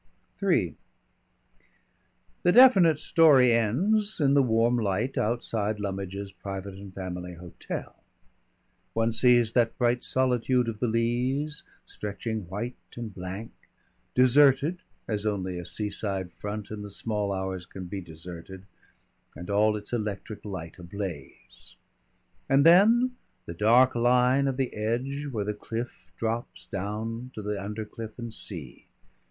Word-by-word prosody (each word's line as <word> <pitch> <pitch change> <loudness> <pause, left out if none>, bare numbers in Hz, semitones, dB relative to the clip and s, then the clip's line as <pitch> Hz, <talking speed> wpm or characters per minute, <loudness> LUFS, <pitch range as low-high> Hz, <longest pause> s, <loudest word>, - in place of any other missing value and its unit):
_" - - +2
III - - +2 1.7
The 175 - +4
definite 195 - +7
story 145 -6 +5
ends 190 - +1
in 140 -2 +3
the 140 - +6
warm 120 -1 +2
light 110 +4 -1
outside 110 -2 -1
Lummidge's 100 0 -4
Private 95 0 -6
and 100 0 -10
Family 90 -1 -6
Hotel. 85 0 -7 1.0
One 115 0 +1
sees 120 -1 +4
that 115 -2 +2
bright 120 -1 +1
solitude 125 -1 +1
of 110 -2 -4
the 125 - +1
Leas 125 +6 0 0.2
stretching 105 0 -5
white 110 +6 -4 0.2
and 115 -3 -5
blank 95 +5 -6 0.6
deserted 140 +6 +5 0.3
as 105 -1 -1
only 95 -3 -2
a 90 - -6
seaside 100 -2 -2
front 105 +3 -6
in 105 -1 -5
the 105 - -7
small 105 0 -2
hours 95 -2 -3
can 95 -1 -8
be 95 +2 -5
deserted 85 +3 -10 0.7
and 90 +5 -7
all 105 +1 +3
its 105 +3 -9
electric 105 -2 -4
light 90 -4 -7
ablaze. 90 -10 -8 0.7
And 135 +1 +4
then 230 +9 +6 0.3
the 85 - -6
dark 120 +8 +5
line 125 +3 +3
of 135 -1 -1
the 135 -2 -1
edge 130 +7 -2
where 110 -6 -2
the 105 - -1
cliff 115 -4 -6
drops 115 +1 -3
down 110 +5 -4
to 105 - -6
the 105 0 -2
undercliff 110 +1 -6
and 120 -2 -6
sea. 80 - -7
110 Hz, 135 wpm, -27 LUFS, 100-125 Hz, 1.7 s, definite